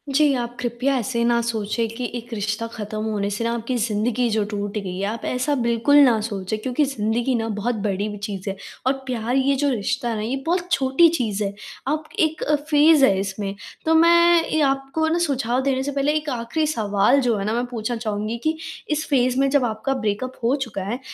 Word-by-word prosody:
जी, 295 -1 +4
आप 240 0 -4
कृपया 250 +3 0
ऐसे 235 0 -1
ना 235 0 +3
सोचें 230 0 -1
कि 250 +1 -3
एक 240 0 -7
रिश्ता 210 +1 -2
ख़त्म 215 -1 -5
होने 205 -2 -1
से 205 +3 -3
न - - 0
आपकी 235 +2 -2
ज़िंदगी 235 +2 0
जो 215 -1 +1
टूट 205 0 -3
गई 190 -3 -4
है। 195 - -3
आप 225 +2 -4
ऐसा 255 +4 0
बिल्कुल 235 +4 +2
ना 240 -5 +4
सोचें 200 -1 -3
क्योंकि 255 +6 0
ज़िंदगी 235 0 -1
न 225 -1 -1
बहुत 230 +4 -1
बड़ी 200 +1 -1
चीज़ 200 -1 -5
है 195 - -3 0.3
और 260 - +4
प्यार 245 -1 -1
ये 270 +1 +3
जो 285 +1 +1
रिश्ता 250 +1 -1
है 225 - -2
न - - -3
ये 230 +5 -2
बहुत 355 +1 -1
छोटी 270 +2 +4
चीज़ 215 -5 -1
है। 200 0 -2 0.3
आप 305 +2 0 0.2
एक 315 -1 +1
अ, 300 - +2
फ़ेज़ 300 0 +4
है 195 -6 +2
इसमें 195 0 -3 0.3
तो 320 - +3
मैं 340 +1 +6
ये 315 - +2
आपको 270 +4 -1
न 325 +2 +1
सुझाव 260 -6 0
देने 265 -1 0
से 285 - -2
पहले 280 +1 +1
एक 305 0 -4
आख़िरी 250 +5 -1
सवाल 215 -1 +2
जो 240 -3 +1
है 195 - -3
न - - 0
मैं 240 +1 0
पूछना 235 0 -3
चाहूँगी 215 0 -3
कि 315 0 0 0.3
इस 305 +1 0
फ़ेज़ 255 -3 +2
में 275 0 +3
जब 280 -1 +3
आपका 225 +4 -2
ब्रेकअप 255 +1 -3
हो 240 +4 +3
चुका 235 -9 -4
है, 225 +6 -3
240 Hz, 220 wpm, -22 LUFS, 215-275 Hz, 0.3 s, मैं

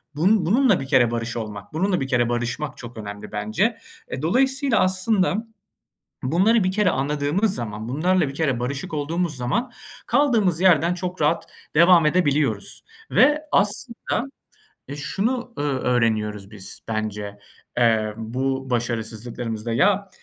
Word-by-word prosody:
bunun 180 +4 +3
bununla 225 +1 +3
bir 135 - -4
kere 120 -5 +4
barış 115 0 -3
olmak, 105 +1 -7
bununla 180 +1 0
bir 135 - -2
kere 120 -2 +1
barışmak 120 +4 -3
çok 120 -1 -10
önemli 105 0 -8
bence. 110 - 0 0.3
E, 130 - -5
dolayısıyla 265 - +2
aslında 190 +3 +1 0.8
bunları 190 - +3
bir 185 - +1
kere 210 -1 +2
anladığımız 150 +8 0
zaman, 110 -1 -5
bunlarla 170 +4 +2
bir - - -7
kere 140 -7 0
barışık 140 +5 -4
olduğumuz 160 +2 -1
zaman 235 - -1 0.4
kaldığımız 215 - +2
yerden 175 -2 +4
çok 180 -1 -5
rahat 155 +3 +2 0.3
devam 170 0 +6
edebiliyoruz 145 - 0 0.3
ve 295 +3 +4
aslında, 220 +4 0 0.6
ııı, 145 - -6
şunu, 235 - -2
ııı, 140 -3 -1
öğreniyoruz 110 -5 0
biz 95 -3 -8
bence, 105 -2 -4 0.4
emm, 110 -3 +2
bu 130 +4 -3
başarısızlıklarımızda: 115 -1 -3
Ya, 200 - +2
145 Hz, 135 wpm, -23 LUFS, 120-185 Hz, 0.8 s, devam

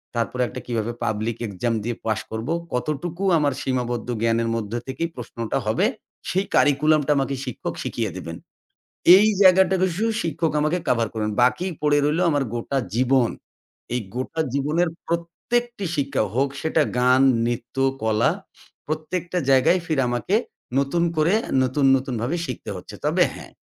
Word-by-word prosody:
তারপরে 115 +2 -1
একটা - - -7
কিভাবে 115 -1 -1
পাবলিক 110 +2 -1
এক্সাম 110 +4 -2
দিয়ে 120 +1 -2
পাস 110 -1 0
করবো? 110 +8 -2 0.2
কতটুকু 155 +8 -3
আমার 145 -3 +1
সীমাবদ্ধ 120 -2 -2
জ্ঞানের 115 0 +1
মধ্যে 115 0 -3
থেকেই 135 +6 -3
প্রশ্নটা 115 -2 -4
হবে? - - +2 0.4
সেই 190 +2 0
কারিকুলামটা 150 +1 +3
আমাকে 135 0 0
শিক্ষক 125 - -5
শিখিয়ে - - -2
দিবেন। 85 0 -6 0.8
এই 210 +3 +5
জায়গাটা 190 0 +6
শুধু 190 +4 +1 0.2
শিক্ষক 165 0 -1
আমাকে 155 +4 +1
কভার 115 -2 +2
করবেন। 110 -1 -2
বাকি 125 +9 +2 0.2
পড়ে 145 -1 +3
রইলো 155 +4 +1
আমার 145 -3 +1
গোটা 120 +3 -2 0.2
জীবন। 130 0 +3 0.6
এই 125 - 0 0.2
গোটা 130 +6 -3
জীবনের 150 +5 +1 0.2
প্রত্যেকটি 205 +7 -2
শিক্ষা 140 -3 0
হোক, 135 +3 +2
সেটা 160 0 +2 0.2
গান, 125 +1 +4 0.2
নৃত্য, 120 0 -3 0.3
কলা। 110 -1 +2 0.6
প্রত্যেকটা 170 +3 -2
জায়গায় 135 +7 +4
ফির 155 -5 +1
আমাকে 120 - -1 0.4
নতুন 140 +5 +1
করে 155 +3 +3 0.2
আ - - -6
নতুন, 130 +2 0
নতুন 130 -1 -3
ভাবে 140 +9 -1
শিখতে 130 - -6
হচ্ছে। - - -10
তবে - - +3
হ্যাঁ। - - -11
135 Hz, 150 wpm, -23 LUFS, 120-165 Hz, 0.8 s, জায়গাটা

